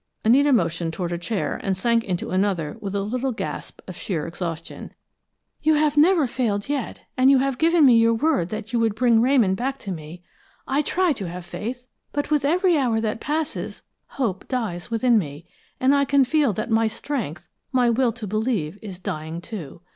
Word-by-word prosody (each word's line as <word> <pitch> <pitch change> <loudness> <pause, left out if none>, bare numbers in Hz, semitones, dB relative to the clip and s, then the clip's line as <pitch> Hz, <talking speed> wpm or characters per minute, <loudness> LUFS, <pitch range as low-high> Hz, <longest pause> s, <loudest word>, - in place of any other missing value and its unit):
Anita 280 +6 +5
motioned 170 -7 +1
toward 175 -2 -3
a 170 - -2
chair 205 +3 -2
and 190 -2 -1
sank 230 +3 +2
into 180 -5 -3
another 185 -5 0
with 200 -1 -5
a 200 - 0
little 250 +6 -2
gasp 235 - -6
of - - -7
sheer 165 -8 -3
exhaustion. 165 -1 -6 0.7
"You 310 0 +3
have 300 -1 +2
never 320 +1 +5
failed 225 -5 -1
yet, 280 -4 -3
and 255 +1 +5
you 275 - +6
have 270 -1 0
given 330 -1 +5
me 240 -3 +7
your 230 0 +4
word 265 - +1
that 220 +1 -6
you 235 - +2
would 225 -2 +1
bring 230 -1 +4
Ramon 245 -6 +4
back 265 +7 -2
to 200 - -5
me. 165 +1 -8 0.4
I 275 +2 +2
try 355 +2 +1
to 195 -9 -5
have 175 0 -7
faith, 245 +7 -6 0.3
but 290 +1 -2
with 295 -2 +2
every 345 +2 +3
hour 235 -5 +1
that 220 0 -2
passes, 310 +1 -3 0.3
hope 220 -9 -2
dies 220 -9 -3
within 230 0 +3
me, 150 -2 -6 0.3
and 260 +2 +4
I 280 0 +3
can 275 -1 +4
feel 290 -1 +2
that 215 +5 -4
my 225 0 +3
strength, 215 - -4 0.2
my 250 -3 +3
will 240 +1 +2
to 235 -3 -7
believe, 210 -5 -1
is 195 -4 -8
dying, 160 -2 -5
too. 170 -5 -8
230 Hz, 195 wpm, -23 LUFS, 185-270 Hz, 0.7 s, me